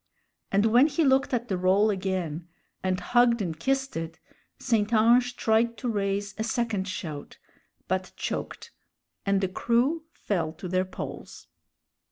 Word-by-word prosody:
And 200 Hz, +2 st, +3 dB
when 240 Hz, +6 st, +6 dB
he 315 Hz, +1 st, +1 dB
looked 270 Hz, 0 st, +3 dB
at 240 Hz, -2 st, -1 dB
the 190 Hz, -4 st, -1 dB
roll 195 Hz, +4 st, +4 dB
again, 185 Hz, -4 st, -3 dB, 0.3 s
and 185 Hz, -1 st, 0 dB
hugged 235 Hz, +5 st, +3 dB
and 165 Hz, -6 st, -3 dB
kissed 270 Hz, +6 st, 0 dB
it, 165 Hz, 0 st, -4 dB, 0.4 s
St. 225 Hz, -3 st, 0 dB
Ange 240 Hz, +2 st, +4 dB
tried 230 Hz, +1 st, +2 dB
to 250 Hz, -, -4 dB
raise 200 Hz, -2 st, -1 dB
a -, -, +1 dB
second 225 Hz, -4 st, -1 dB
shout, 155 Hz, -6 st, -6 dB, 0.5 s
but -, -, -1 dB
choked, -, -, -5 dB, 0.6 s
and 195 Hz, 0 st, +3 dB
the 190 Hz, -, +1 dB
crew 245 Hz, -, +1 dB
fell 165 Hz, -6 st, -2 dB
to 175 Hz, +3 st, -8 dB
their 185 Hz, +1 st, +1 dB
poles. 185 Hz, -, -8 dB
210 Hz, 150 wpm, -27 LUFS, 185-240 Hz, 0.6 s, when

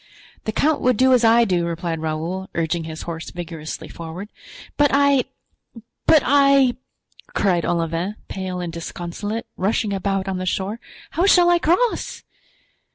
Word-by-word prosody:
"The 220 Hz, -, -1 dB
count 300 Hz, +7 st, +1 dB
would 250 Hz, -3 st, +2 dB
do 260 Hz, +2 st, +5 dB
as 245 Hz, -2 st, +4 dB
I 230 Hz, +1 st, +6 dB
do," 180 Hz, -4 st, +1 dB
replied 170 Hz, -1 st, -3 dB
Raoul, 160 Hz, +4 st, -3 dB
urging 165 Hz, 0 st, -1 dB
his 160 Hz, -1 st, -7 dB
horse 165 Hz, -1 st, -6 dB
vigorously 165 Hz, -3 st, -7 dB
forward. 170 Hz, +5 st, -8 dB, 0.5 s
"But 290 Hz, 0 st, +4 dB
I—but 280 Hz, 0 st, 0 dB
I," 275 Hz, -2 st, +5 dB, 0.6 s
cried 180 Hz, -4 st, +2 dB
Olivain, 170 Hz, +4 st, -1 dB
pale 185 Hz, -1 st, -4 dB
and 175 Hz, -2 st, -4 dB
disconsolate 175 Hz, +6 st, -5 dB
rushing 205 Hz, +1 st, 0 dB
about 195 Hz, 0 st, -1 dB
on 190 Hz, -1 st, -2 dB
the 185 Hz, -, -4 dB
shore, 195 Hz, +5 st, -2 dB, 0.3 s
"how 355 Hz, +4 st, +1 dB
shall 350 Hz, -2 st, +6 dB
I 345 Hz, -, +4 dB
cross?" 365 Hz, +9 st, 0 dB
195 Hz, 145 wpm, -21 LUFS, 170-255 Hz, 0.6 s, I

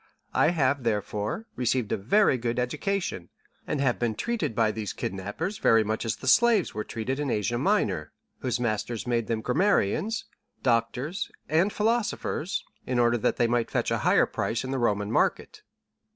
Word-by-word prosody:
I -, -, +4 dB
have, 140 Hz, -5 st, +1 dB
therefore, 105 Hz, -, -2 dB
received 125 Hz, -2 st, 0 dB
a -, -, +3 dB
very 135 Hz, -, +3 dB
good 120 Hz, -1 st, -2 dB
education, 125 Hz, -, -2 dB, 0.4 s
and 145 Hz, -, -1 dB
have 130 Hz, -3 st, +1 dB
been 115 Hz, -3 st, 0 dB
treated 235 Hz, -, -2 dB
by 110 Hz, -2 st, +3 dB
these 105 Hz, -2 st, -4 dB
kidnappers 105 Hz, -, -4 dB
very 115 Hz, -1 st, +5 dB
much 110 Hz, +2 st, -2 dB
as 115 Hz, -, 0 dB
the 130 Hz, -, -9 dB
slaves 230 Hz, -, +4 dB
were 105 Hz, -, -3 dB
treated 125 Hz, +6 st, -3 dB
in 145 Hz, -2 st, -1 dB
Asia 120 Hz, +2 st, 0 dB
Minor, 110 Hz, -, +1 dB, 0.3 s
whose 125 Hz, -2 st, -1 dB
masters 115 Hz, -1 st, -2 dB
made 120 Hz, -2 st, 0 dB
them 115 Hz, -1 st, -1 dB
grammarians, 190 Hz, -, +1 dB, 0.4 s
doctors, 125 Hz, -, 0 dB, 0.2 s
and 170 Hz, +6 st, +2 dB
philosophers, 215 Hz, -6 st, -1 dB, 0.2 s
in 125 Hz, -, 0 dB
order 120 Hz, 0 st, +3 dB
that -, -, +1 dB
they 120 Hz, -, +3 dB
might 120 Hz, 0 st, +1 dB
fetch -, -, -1 dB
a -, -, +1 dB
higher -, -, +4 dB
price 115 Hz, -, -2 dB
in 130 Hz, -, -4 dB
the 135 Hz, -, -1 dB
Roman 105 Hz, -3 st, 0 dB
market." -, -, 0 dB
120 Hz, 170 wpm, -27 LUFS, 110-155 Hz, 0.4 s, very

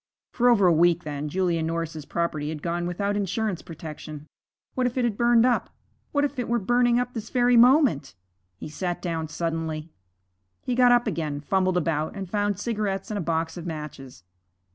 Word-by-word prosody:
For 245 Hz, 0 st, +3 dB
over 215 Hz, -5 st, +4 dB
a 175 Hz, -, +6 dB
week, 170 Hz, +1 st, +3 dB
then, 150 Hz, 0 st, -4 dB
Julia 175 Hz, -1 st, 0 dB
Norris's 160 Hz, -1 st, -3 dB
property 155 Hz, -3 st, -2 dB
had 155 Hz, -2 st, -6 dB
gone 175 Hz, 0 st, -2 dB
without 200 Hz, +3 st, -1 dB
insurance 205 Hz, -1 st, -1 dB
protection. 155 Hz, -2 st, -9 dB, 0.5 s
What 255 Hz, -1 st, +1 dB
if 245 Hz, -, -5 dB
it 255 Hz, -, +2 dB
had 230 Hz, -4 st, 0 dB
burned 235 Hz, +1 st, +4 dB
up? 250 Hz, -1 st, +1 dB, 0.4 s
What 285 Hz, 0 st, +2 dB
if 285 Hz, -2 st, -4 dB
it 245 Hz, -, -3 dB
were 240 Hz, -, +2 dB
burning 240 Hz, +3 st, +2 dB
up 245 Hz, 0 st, -1 dB
at -, -, -29 dB
this 225 Hz, -3 st, -6 dB
very 245 Hz, -1 st, +3 dB
moment? 240 Hz, -, +4 dB, 0.4 s
He -, -, -7 dB
sat 175 Hz, +3 st, -3 dB
down 165 Hz, -3 st, -3 dB
suddenly. 160 Hz, -1 st, -3 dB, 0.7 s
He 250 Hz, -, -1 dB
got 245 Hz, 0 st, +5 dB
up 240 Hz, 0 st, +4 dB
again, 155 Hz, -8 st, -2 dB
fumbled 185 Hz, +4 st, +1 dB
about, 160 Hz, -1 st, -1 dB
and 195 Hz, -2 st, -5 dB
found 205 Hz, +1 st, -1 dB
cigarettes 205 Hz, -3 st, -2 dB
and 210 Hz, -, -2 dB
a -, -, -2 dB
box 165 Hz, 0 st, -2 dB
of 175 Hz, 0 st, -6 dB
matches. 150 Hz, -, -8 dB
180 Hz, 190 wpm, -25 LUFS, 160-235 Hz, 0.7 s, a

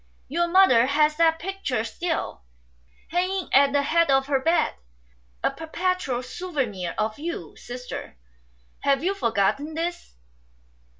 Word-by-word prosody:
Your 345 Hz, +5 st, 0 dB
mother 340 Hz, -10 st, +5 dB
has 300 Hz, +2 st, +3 dB
that 325 Hz, -1 st, +4 dB
picture 340 Hz, -, -2 dB
still, 325 Hz, -, -3 dB, 0.7 s
hanging 370 Hz, +2 st, -1 dB
at 275 Hz, +1 st, +6 dB
the 285 Hz, 0 st, +2 dB
head 335 Hz, +3 st, +2 dB
of 270 Hz, 0 st, +4 dB
her 275 Hz, -1 st, +1 dB
bed, 330 Hz, +5 st, +2 dB, 0.7 s
a -, -, +2 dB
perpetual 325 Hz, -6 st, -2 dB
souvenir 255 Hz, -, -3 dB
of 215 Hz, +4 st, -1 dB
you. 335 Hz, +3 st, -5 dB
Sister, 250 Hz, -, -8 dB, 0.6 s
have 275 Hz, +1 st, +1 dB
you 380 Hz, +3 st, +1 dB
forgotten 275 Hz, -, 0 dB
this 335 Hz, -, -4 dB
300 Hz, 125 wpm, -25 LUFS, 255-345 Hz, 0.7 s, at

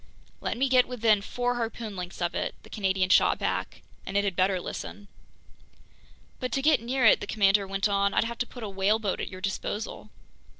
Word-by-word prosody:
"Let -, -, -3 dB
me 270 Hz, +2 st, +2 dB
get 255 Hz, -1 st, +4 dB
within 225 Hz, -4 st, +2 dB
four 245 Hz, +3 st, -2 dB
harpoon 225 Hz, -2 st, -4 dB
lengths 180 Hz, -1 st, -5 dB
of 175 Hz, -, -1 dB
it," -, -, -2 dB
the -, -, -16 dB
Canadian 190 Hz, -2 st, 0 dB
shot -, -, +5 dB
back, -, -, -3 dB, 0.2 s
"and 195 Hz, -, -3 dB
it 200 Hz, -, +3 dB
had 195 Hz, -3 st, -1 dB
better 185 Hz, +1 st, +2 dB
listen!" 200 Hz, +3 st, -7 dB, 1.3 s
"But 255 Hz, -2 st, -3 dB
to 270 Hz, -, +1 dB
get 305 Hz, -3 st, +4 dB
near 250 Hz, +1 st, 0 dB
it," 220 Hz, -, +7 dB
the 205 Hz, -, -5 dB
commander 200 Hz, -1 st, +3 dB
went 195 Hz, +1 st, 0 dB
on, 200 Hz, 0 st, +1 dB
"I'd -, -, +4 dB
have 235 Hz, +1 st, -5 dB
to 245 Hz, -, -1 dB
put 245 Hz, -, -10 dB
a -, -, -3 dB
whaleboat 200 Hz, +1 st, 0 dB
at -, -, -3 dB
your 185 Hz, 0 st, -9 dB
disposal?" 205 Hz, +2 st, -4 dB
205 Hz, 205 wpm, -27 LUFS, 195-235 Hz, 1.3 s, it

